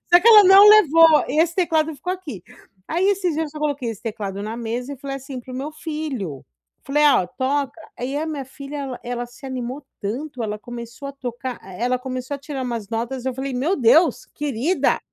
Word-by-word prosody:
Só 350 - +10
que - - -2
ela 430 -2 +10
não 385 +2 +9
levou, 330 -6 +7
e 300 - -1
esse 335 +1 +2
teclado 320 -4 +1
ficou 295 +6 -5
aqui. 305 - -7 0.5
Aí 345 +4 0
esses 380 -4 +1
dias 320 +2 0
eu 300 - -7
só 305 - -9
coloquei 285 -5 -2
esse 220 - -8
teclado 205 -3 -4
na 220 +2 -5
mesa 240 +4 -4
e - - -14
falei 275 0 -5
assim 265 -1 -8
para 255 +1 -11
o 255 - -5
meu 280 +3 -4
filho, 300 - -5 0.4
falei 295 +2 +1
"Ó, 230 -10 +4
toca", 275 - -2 0.2
aí 260 +3 -3
a 305 - -1
minha 295 -4 -4
filha, 280 +2 -9
ela 270 -3 -5
ela 245 0 -3
se 245 +3 -17
animou 260 +2 -5 0.2
tanto, 250 +5 -4
ela 210 -1 -3
começou 235 +4 -8
a 280 - -7
tocar 250 -1 -6
e 190 +3 -9
ela 250 +1 +1
começou 255 +1 -5
a - - -15
tirar 280 -1 -5
umas 230 -5 -4
notas, 240 +3 -3
eu 260 - -1
falei 265 +1 -4
"Meu 300 +10 0
Deus, 285 +7 +4
querida, 295 +4 0
270 Hz, 220 wpm, -22 LUFS, 240-305 Hz, 0.5 s, Só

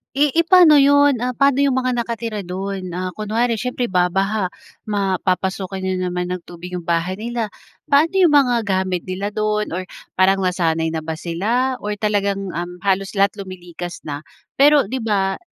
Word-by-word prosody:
Eh 290 +2 +4
eh 335 - +4
pano 335 -3 +7
yun, 285 -1 +5
ah, 250 - -1
paano 275 +2 +3
yung 275 - +2
mga 255 -1 0
nakatira 230 -3 -3
dun. 185 0 -5
Ah 185 +1 -3
kunwari 225 +2 0
syempre 250 +1 -2
babaha, 190 +2 0 0.3
mapapasukan 190 -1 -1
na 190 0 -1 0.2
naman 180 0 -2
ng 180 -1 -4
tubig 175 +1 -8
yung 175 - -7
bahay 170 +2 0
nila. 230 0 -3 0.4
Paano 300 +5 +4
yung 355 - +6
mga 260 -5 +4
gamit 190 -3 -1
nila 195 +3 -3
dun 210 -1 -1
or 185 +1 -4 0.2
parang 190 +1 +3
nasanay 165 -3 0
na 160 - -2
ba 160 0 -5
sila, 230 +11 -1
or 210 0 -3
talagang, 200 -2 -1
um, 175 +1 -5
halos 195 +1 0
lahat 200 0 +3
lumilikas 175 -2 -8
na? 145 -2 -5 0.4
Pero, 290 0 +6
'di 255 +6 -4
ba, 200 -4 0
195 Hz, 170 wpm, -20 LUFS, 180-240 Hz, 0.4 s, pano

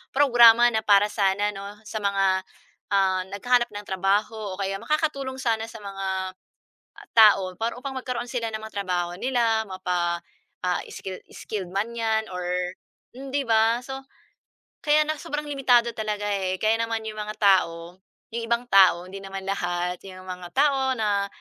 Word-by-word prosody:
programa 240 -4 +7
na 220 - +1
para 205 -1 +5
sana 205 0 +1
'no, 200 +1 -9
sa 215 - -5
mga, 195 -1 +2 0.5
ah, 190 -1 +2
naghahanap 240 +5 +1
ng 205 0 -7
trabaho 200 +2 0
o - - -16
kaya 195 0 -2
makakatulong 275 -4 -1
sana 225 -3 0
sa 225 - -10
mga, 195 -1 -5 0.9
ah, - - -15
tao 195 -4 +6
para 230 +1 -1
upang 265 +2 -6
magkaroon 250 -1 -4
sila 235 -3 -2
ng 215 - -4
mga 220 - -8
trabaho 175 -2 -2
nila, 230 -1 +1
mapa, 180 -2 -2 0.4
ah, 180 -1 0
skill 190 -1 -6 0.2
skilled 195 -5 -5
man 200 +4 -1
'yan 220 -1 0
or 180 0 -4 0.7
hmm, 270 +1 -8
‘di 285 - +2
ba. 225 +1 +4
So, 270 0 -6 0.8
kaya 300 0 +4
na 310 - 0
sobrang 295 0 -4
limitado 245 -4 +3
talaga 210 -1 -3
eh. 190 -2 -1
Kaya 220 +1 +3
naman 225 -1 -3
'yong 215 - -7
mga 210 0 -5
tao, 180 -3 +2 0.4
'yong 230 0 -2
ibang 235 +1 +1
tao, 185 -2 +6
hindi 195 +1 -8
naman 195 0 -7
lahat, 180 -2 -1
‘yong 185 -1 -11
mga 180 -1 -6
tao 270 -2 +3
na, 205 -2 +1
210 Hz, 165 wpm, -25 LUFS, 190-235 Hz, 0.9 s, programa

